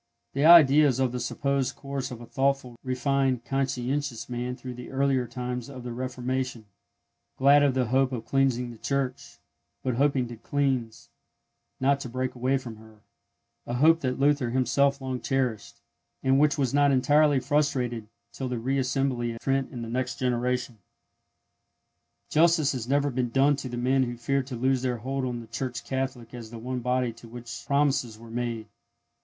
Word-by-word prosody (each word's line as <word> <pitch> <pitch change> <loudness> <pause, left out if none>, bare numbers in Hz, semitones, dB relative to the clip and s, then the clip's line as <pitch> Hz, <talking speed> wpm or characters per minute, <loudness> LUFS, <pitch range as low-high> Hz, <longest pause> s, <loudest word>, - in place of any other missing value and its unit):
The 140 +2 +1
idea 155 -3 +8
is 130 -2 0
of 130 -2 +2
the 125 - -3
supposed 140 +2 -1
course 140 -1 -4
of 120 -2 -8
a - - -8
thoughtful, 135 -1 0
refined, 130 -1 0
conscientious 135 -2 -2
man 125 0 -3
through 125 0 -8
the 125 0 -9
earlier 135 -2 +1
times 125 +1 -5
of 130 -3 -9
the 120 - -5
Reformation, 125 -1 -3 0.7
glad 140 +2 +6
of 140 -2 +3
the 130 -1 +2
hope 130 +3 +2
of 115 -3 -4
cleansing 125 -2 +1
the 115 - -13
Church, 135 -2 -3 0.5
but 130 - 0
hoping 135 -2 +2
to 120 - -8
cleanse, 125 -3 -2 0.7
not 140 +1 +2
to 130 - -6
break 130 +1 -2
away 130 +2 +1
from 120 -4 -8
her—a 110 +2 -13
hope 160 +6 +5
that 130 -5 -2
Luther 140 -3 +2
himself 140 +2 +2
long 130 -1 -4
cherished, 130 -6 -2 0.4
and 135 +1 +3
which 150 +2 +3
was 135 -3 0
not 145 0 +4
entirely 145 +2 +4
frustrated 130 -6 0 0.3
till 130 +2 -4
the 125 - -2
re 135 +4 -1
assembly 130 -3 0
at 115 - -10
Trent 135 -1 0
in 120 -2 -6
the - - -5
next 125 +1 -2
generation. 125 -1 -1 1.5
Justice 160 -2 +4
has 125 -4 -4
never 145 +1 +2
been 125 -1 -1
done 135 +4 +3
to 140 -2 -5
the 120 - -5
men 130 +2 +2
who 120 -2 -2
feared 130 +2 -1
to 130 - -5
loose 130 +2 +1
their 125 -2 -1
hold 130 +3 -3
on 120 -2 -3
the - - -10
Church 120 +1 -4
Catholic 130 -3 -4
as 120 -2 -8
the 115 - -9
one 125 +2 -4
body 125 -1 0
to 115 +1 -14
which 115 0 -8
the - - -19
promises 140 -5 +1
were 115 0 -13
made. 120 -2 -3
130 Hz, 180 wpm, -27 LUFS, 120-135 Hz, 1.5 s, idea